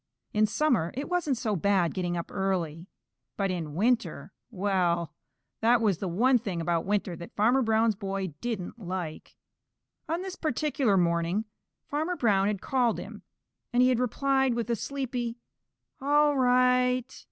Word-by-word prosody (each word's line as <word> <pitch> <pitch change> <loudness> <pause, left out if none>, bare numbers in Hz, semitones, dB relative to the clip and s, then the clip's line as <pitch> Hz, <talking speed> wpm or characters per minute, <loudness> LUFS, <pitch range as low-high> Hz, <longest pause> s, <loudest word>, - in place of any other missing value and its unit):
In 215 0 +3
summer 225 - +1
it 280 +3 -4
wasn't 340 -7 0
so 220 -4 -1
bad 190 -1 +2
getting 175 -2 -2
up 170 - -5
early, 180 -4 -2 0.5
but 195 -2 0
in 160 -5 -4
winter 235 +6 0 0.2
well, 180 -6 0 0.5
that 235 +2 +4
was 205 -7 +1
the 195 - -3
one 240 +9 +3
thing 195 -6 -4
about 165 0 0
winter 200 -3 0
that 170 +1 -10
Farmer 240 +6 +3
Brown's 225 -1 +3
boy 195 -3 -4
didn't 230 -2 -4
like. 180 -5 -6 0.7
On 335 +3 -1
this 380 -1 -6
particular 280 - 0
morning 170 +4 +1 0.4
Farmer 315 +5 -2
Brown 200 - +2
had 205 -2 -1
called 250 -4 +1
him, - - -8 0.5
and 245 0 +4
he 255 - +5
had 250 -2 +2
replied 265 +1 +1
with 235 0 -2
a - - +2
sleepy 245 -1 -3 0.6
"All 295 +1 +3
right." 250 -1 +3
220 Hz, 150 wpm, -28 LUFS, 185-255 Hz, 0.7 s, he